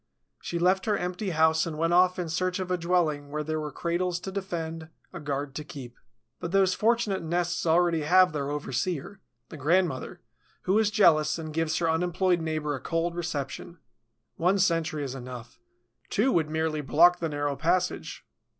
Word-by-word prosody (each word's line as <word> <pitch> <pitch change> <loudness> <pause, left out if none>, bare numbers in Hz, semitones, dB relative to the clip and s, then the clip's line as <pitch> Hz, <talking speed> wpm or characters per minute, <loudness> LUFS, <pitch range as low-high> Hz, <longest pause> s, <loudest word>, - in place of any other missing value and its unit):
She 170 - -4
left 185 +3 +2
her 210 -2 +2
empty 180 +3 -3
house 160 -1 +3
and 155 -2 -5
went 165 +2 +1
off 180 +1 +4
in 180 -2 -3
search 180 +3 -1
of 185 -1 -4
a - - +3
dwelling 165 -4 0
where 150 +1 -3
there 155 +1 -2
were 150 -1 -4
cradles 175 +3 -1
to 190 - -6
defend, 165 -4 -5 0.2
a - - -6
guard 140 -2 -3
to 150 - -5
keep. 130 -5 -10 0.4
But 170 - -5
those 190 -1 +3
fortunate 225 -2 +1
nests 175 +1 -1
already 170 0 +3
have 180 +3 +4
their 140 -2 -2
overseer, 150 - -3 0.3
the 155 - -9
grandmother, 160 -1 0 0.4
who 195 +4 +2
is 220 -2 +3
jealous 155 -8 +4
and 155 -2 -6
gives 160 0 0
her 170 - 0
unemployed 175 +2 +1
neighbor 155 -2 -2
a 135 - -5
cold 165 +4 -1
reception. 170 0 -5 0.6
One 180 +4 +2
sentry 165 -4 +1
is 135 -2 -4
enough; 125 -2 -9 0.5
two 245 +6 +2
would 160 -6 +1
merely 160 -1 -1
block 175 +5 +5
the 165 - -2
narrow 145 -1 -2
passage. 180 +4 -1
165 Hz, 180 wpm, -27 LUFS, 150-180 Hz, 0.6 s, block